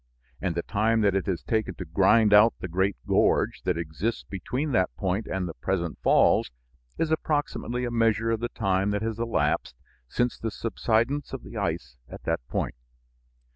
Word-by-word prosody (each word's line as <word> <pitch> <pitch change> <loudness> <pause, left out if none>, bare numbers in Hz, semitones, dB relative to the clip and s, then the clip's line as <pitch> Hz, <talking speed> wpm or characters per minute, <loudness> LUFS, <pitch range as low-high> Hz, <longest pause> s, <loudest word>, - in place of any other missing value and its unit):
And 90 -3 -1
the 85 - -1
time 110 +2 +1
that 100 -2 +3
it 95 +1 -1
has 95 -3 -2
taken 110 -2 -1
to 90 - -6
grind 100 +6 +4
out 105 +3 +7
the - - -4
great 95 +3 0
gorge - - +2
that 90 -2 +1
exists 85 +8 -3
between 125 - -3
that 95 -7 +2
point 95 +7 -1
and 95 -1 -2
the 85 - -6
present 85 -3 -2
falls - - +4 0.5
is 160 -1 0
approximately 145 -5 -1
a 120 - -3
measure 115 -1 +2
of 115 - 0
the 120 +1 -2
time 95 -2 0
that 105 +1 -1
has 115 0 -3
elapsed 115 - 0 0.3
since 120 - -1
the 115 - -2
subsidence 115 +5 -1
of - - -5
the - - -11
ice 65 +1 -3
at - - -10
that - - 0
point. - - -2
105 Hz, 180 wpm, -26 LUFS, 95-115 Hz, 0.5 s, out